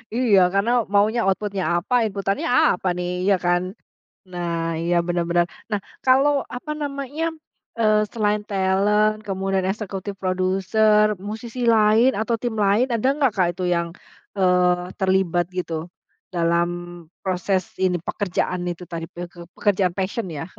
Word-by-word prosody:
Iya, 230 Hz, -6 st, +4 dB
karena 200 Hz, +4 st, +2 dB, 0.2 s
maunya 215 Hz, +4 st, +3 dB
output-nya 195 Hz, 0 st, -1 dB
apa, 175 Hz, +8 st, -3 dB
inputannya 195 Hz, 0 st, -2 dB, 0.3 s
apa 185 Hz, +1 st, -4 dB
nih, 180 Hz, 0 st, -2 dB, 0.2 s
iya 195 Hz, 0 st, +4 dB
kan? 175 Hz, 0 st, +3 dB, 0.7 s
Nah, 175 Hz, -1 st, -4 dB, 0.3 s
iya 175 Hz, +1 st, 0 dB
bener-bener. 175 Hz, 0 st, +1 dB, 0.3 s
Nah 205 Hz, -, 0 dB, 0.2 s
kalau, 270 Hz, +3 st, +5 dB, 0.2 s
apa 300 Hz, +5 st, -7 dB
namanya, 280 Hz, +2 st, -4 dB, 0.5 s
eee, 215 Hz, -1 st, +4 dB
selain 210 Hz, -2 st, +1 dB
talent 205 Hz, +2 st, +2 dB
kemudian 195 Hz, -1 st, -1 dB
executive 195 Hz, -1 st, -4 dB
producer, 190 Hz, +3 st, +2 dB, 0.2 s
musisi 230 Hz, +3 st, -6 dB
lain 220 Hz, +4 st, +5 dB
atau 230 Hz, +2 st, 0 dB
tim 240 Hz, -2 st, -2 dB
lain, 205 Hz, +6 st, +3 dB
ada 230 Hz, +2 st, 0 dB
nggak 275 Hz, -7 st, +2 dB
Kak 180 Hz, -3 st, +3 dB
itu 185 Hz, +1 st, -5 dB
yang, 170 Hz, 0 st, -1 dB, 0.5 s
eee, 180 Hz, -1 st, +2 dB
terlibat 185 Hz, -2 st, +2 dB
gitu 170 Hz, -2 st, -3 dB, 0.6 s
dalam 170 Hz, 0 st, +1 dB, 0.6 s
proses 185 Hz, 0 st, 0 dB, 0.2 s
ini, 180 Hz, -1 st, +2 dB
pekerjaan 180 Hz, -2 st, -1 dB
itu 175 Hz, +1 st, -7 dB
tadi 165 Hz, -1 st, -5 dB
peke 175 Hz, 0 st, -9 dB
pekerjaan 195 Hz, -3 st, +1 dB
passion 190 Hz, +3 st, -2 dB
ya? 150 Hz, +1 st, -5 dB
195 Hz, 135 wpm, -22 LUFS, 180-215 Hz, 0.7 s, kalau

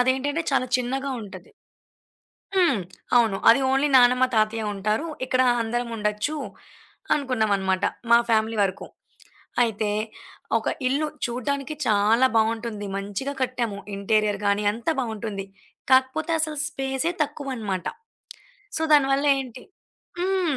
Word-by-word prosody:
అదేంటంటే 265 Hz, +5 st, +1 dB
చాలా 270 Hz, -2 st, +1 dB
చిన్నగా 265 Hz, +2 st, -2 dB
ఉంటది. 205 Hz, -, -11 dB, 1.1 s
హ్మ్. 335 Hz, -, +3 dB, 0.4 s
అవును. 225 Hz, -5 st, +4 dB
అది 235 Hz, +4 st, +5 dB
ఓన్లీ 270 Hz, +2 st, +2 dB
నానమ్మ, 250 Hz, +1 st, +5 dB
తాతయ్య 215 Hz, 0 st, +1 dB
ఉంటారు. 210 Hz, +9 st, -1 dB, 0.2 s
ఇక్కడ 255 Hz, 0 st, +2 dB, 0.2 s
అందరముండొచ్చు 230 Hz, +2 st, -2 dB, 0.8 s
అనుకున్నామన్నమాట. 205 Hz, -8 st, 0 dB, 0.3 s
మా 235 Hz, -, +8 dB
ఫ్యామిలీ 220 Hz, 0 st, +2 dB
వరకు. 190 Hz, 0 st, -4 dB, 0.8 s
అయితే 220 Hz, -2 st, 0 dB, 0.7 s
ఒక 220 Hz, -, -4 dB, 0.2 s
ఇల్లు 285 Hz, +4 st, 0 dB, 0.2 s
చూడడానికి 275 Hz, +5 st, -3 dB
చాలా 220 Hz, +3 st, +4 dB
బాగుంటుంది. 225 Hz, -1 st, 0 dB
మంచిగా 205 Hz, +7 st, -4 dB
కట్టాము. 240 Hz, -5 st, -2 dB, 0.2 s
ఇంటీరియర్ 210 Hz, 0 st, +1 dB
గానీ 200 Hz, +1 st, +2 dB
అంత 230 Hz, +2 st, -10 dB
బావుంటుంది. 220 Hz, -4 st, -4 dB, 0.5 s
కాకపోతే 260 Hz, +5 st, +3 dB
అసలు 310 Hz, -1 st, -2 dB
స్పేసే 270 Hz, +3 st, -2 dB
తక్కువన్నమాట. 255 Hz, -, -4 dB, 0.9 s
సో, 320 Hz, -, -1 dB
దాని 285 Hz, -2 st, +5 dB
వల్ల 280 Hz, +2 st, 0 dB
ఏంటి 255 Hz, -2 st, -7 dB, 0.6 s
హ్మ్. 365 Hz, -4 st, 0 dB
240 Hz, 110 wpm, -24 LUFS, 215-270 Hz, 1.1 s, మా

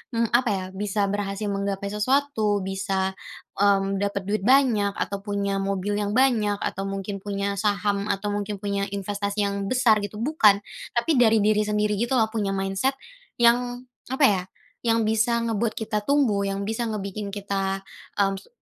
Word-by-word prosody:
mmm 230 Hz, -1 st, +1 dB
apa 240 Hz, 0 st, +3 dB
ya? 190 Hz, -2 st, -1 dB
Bisa 205 Hz, +1 st, -1 dB
berhasil 205 Hz, 0 st, -2 dB
menggapai 200 Hz, 0 st, -2 dB
sesuatu, 215 Hz, -3 st, +1 dB
bisa, 190 Hz, 0 st, -1 dB, 0.5 s
mmm, 195 Hz, -1 st, +3 dB
dapat 200 Hz, -1 st, -1 dB
duit 210 Hz, +2 st, -1 dB
banyak, 225 Hz, -4 st, +3 dB
atau 200 Hz, -, -3 dB
punya 200 Hz, -1 st, -1 dB
mobil 200 Hz, +1 st, -1 dB
yang 205 Hz, +1 st, -1 dB
banyak, 220 Hz, -6 st, +3 dB
atau 195 Hz, +1 st, -3 dB
mungkin 195 Hz, 0 st, -4 dB
punya 200 Hz, 0 st, -2 dB
saham 205 Hz, -1 st, 0 dB
atau 205 Hz, +1 st, -1 dB
mungkin 205 Hz, 0 st, -2 dB
punya 200 Hz, 0 st, -2 dB
investasi 200 Hz, +1 st, -2 dB
yang 200 Hz, 0 st, -2 dB
besar 235 Hz, -4 st, +4 dB
gitu, 205 Hz, 0 st, -5 dB
bukan. 215 Hz, -6 st, +3 dB, 0.3 s
Tapi 235 Hz, +7 st, +1 dB
dari 225 Hz, -3 st, +5 dB
diri 210 Hz, 0 st, +3 dB
sendiri 210 Hz, -1 st, 0 dB
gitu 240 Hz, +3 st, 0 dB
loh, 220 Hz, -2 st, +2 dB
punya 205 Hz, -3 st, -1 dB
mindset 195 Hz, +8 st, 0 dB, 0.4 s
yang, 245 Hz, +1 st, +3 dB, 0.3 s
apa 265 Hz, +2 st, 0 dB
ya? 195 Hz, -7 st, +3 dB, 0.5 s
Yang 230 Hz, 0 st, +3 dB, 0.2 s
bisa 235 Hz, +1 st, +2 dB
ngebuat 225 Hz, 0 st, -1 dB
kita 215 Hz, -1 st, -2 dB
tumbuh, 230 Hz, -9 st, +2 dB
yang 195 Hz, 0 st, -2 dB
bisa 225 Hz, +3 st, -2 dB
ngebikin 200 Hz, -1 st, -4 dB
kita, 195 Hz, -1 st, -2 dB, 0.4 s
m 195 Hz, 0 st, -1 dB
se -, -, -20 dB
205 Hz, 165 wpm, -25 LUFS, 200-225 Hz, 0.5 s, dari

